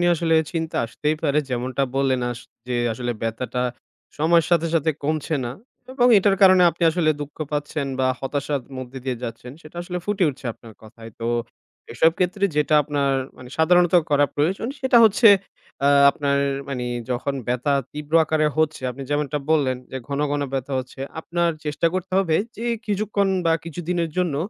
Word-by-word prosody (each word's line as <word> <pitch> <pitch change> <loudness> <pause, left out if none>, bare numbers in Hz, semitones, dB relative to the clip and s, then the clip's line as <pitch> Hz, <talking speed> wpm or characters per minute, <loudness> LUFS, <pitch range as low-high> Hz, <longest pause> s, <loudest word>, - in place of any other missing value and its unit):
নিয়ে 175 0 +4
আসলে 165 0 +1 0.2
চিন্তা 160 -1 -3
আসতেই 150 +6 -2
পারে। 150 -1 +2
যেমনটা 125 +2 -1
বললেন, 135 -2 +1
আস 120 -1 -6 0.3
যে 125 - -1 0.2
আসলে 120 +1 -3
ব্যথাটা 125 +2 -2 0.6
সময়ের 165 +1 +3
সাথে, 170 -1 +3
সাথে 160 0 +2
কমছে 155 +1 -1
না 120 - -3 0.4
এবং 245 -2 +3
এটার 195 0 +3
কারণে 185 -1 +7
আপনি 170 - -9
আসলে 160 -2 +1
দুঃখ 145 0 -7 0.2
পাচ্ছেন 145 -1 -2
বা 130 - +2
হতাশার 140 +1 -2 0.2
মধ্য 130 +1 -7
দিয়ে 130 -2 -2
যাচ্ছেন, 120 +2 -7
সেটা 155 +3 -14
আসলে 180 0 -4
ফুটে 205 -3 +1
উঠছে 135 - -15
আপনার 115 -1 -15
কথায়। 115 +1 -12
তো, 115 - -2 0.7
এসব 160 - +4
ক্ষেত্রে 190 +3 +1
যেটা 150 +1 +2
আপনার 140 -1 0 0.2
মানে 125 -1 -11
সাধারণত 175 +2 +4 0.2
করা 145 0 +4
প্রয়োজন 185 - 0
সেটা 260 -2 +3
হচ্ছে, 220 +2 +6 0.6
আ - - +4 0.2
আপনার 140 -1 0 0.3
মানে 125 -3 -3 0.3
যখন 130 +3 -1
ব্যথা 125 +4 0 0.2
তীব্র 150 +1 -8
আকারে 155 0 +1
হচ্ছে, 155 -3 0
আপনি 135 +3 -8
যেমনটা 145 0 0
বললেন, 135 -5 +2
যে - - -5
ঘন, 140 0 -2
ঘন 145 0 0
ব্যথা 135 +1 -3
হচ্ছে, 130 +1 -8 0.2
আপনার 170 +1 0
চেষ্টা 150 +3 0
করতে 185 0 -4
হবে 165 -5 +2 0.2
যে, 230 - -6 0.2
কিছুক্ষণ 205 -1 0 0.2
বা 165 - +4
কিছুদিনের 170 0 -3
জন্য 170 -6 0
150 Hz, 170 wpm, -22 LUFS, 135-175 Hz, 0.7 s, কারণে